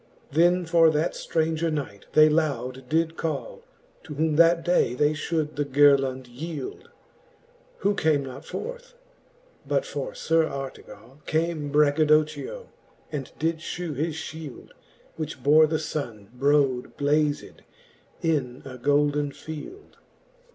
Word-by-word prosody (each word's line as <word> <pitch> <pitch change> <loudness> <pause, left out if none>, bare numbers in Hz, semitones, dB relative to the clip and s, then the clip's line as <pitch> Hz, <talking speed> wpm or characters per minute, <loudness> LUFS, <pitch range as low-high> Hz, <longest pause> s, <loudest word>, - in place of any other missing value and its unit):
Then 175 +4 +3
for 165 0 +5
that 155 +2 0
ftranger 160 0 -1
knight 135 -10 -5
they 155 0 +7
loud 130 -5 -1
did 165 +1 +1
call. 480 - -4 0.4
To 150 -4 -7
whom 155 +1 +1
that 165 +1 +5
day 175 -8 +2
they 145 +3 +3
fhould 155 -1 -2
the 145 - +2
girlond 135 -2 +3
yield; 155 - -7 0.9
Who 205 - +2
came 150 -6 +1
not 130 -1 -8
forth: - - -7 0.7
but - - +1
for - - -5
Sir 165 0 +2
Artegall 135 -2 -8
Came 160 -2 -1
Braggadocchio^ 155 - +2 0.5
and 140 -4 -5
did 165 +1 0
fhew 160 0 -5
his 155 +3 -2
fhield, 155 -3 -8 0.5
Which 155 -5 -5
bore 155 +3 +6
the 160 +1 0
Sunne 120 -10 -5
brode 135 -2 +1
blazed 145 +1 0 0.6
in 140 -6 -1
a 130 -2 -9
golden 145 +1 +2
field. 160 - -10
155 Hz, 125 wpm, -25 LUFS, 140-165 Hz, 0.9 s, they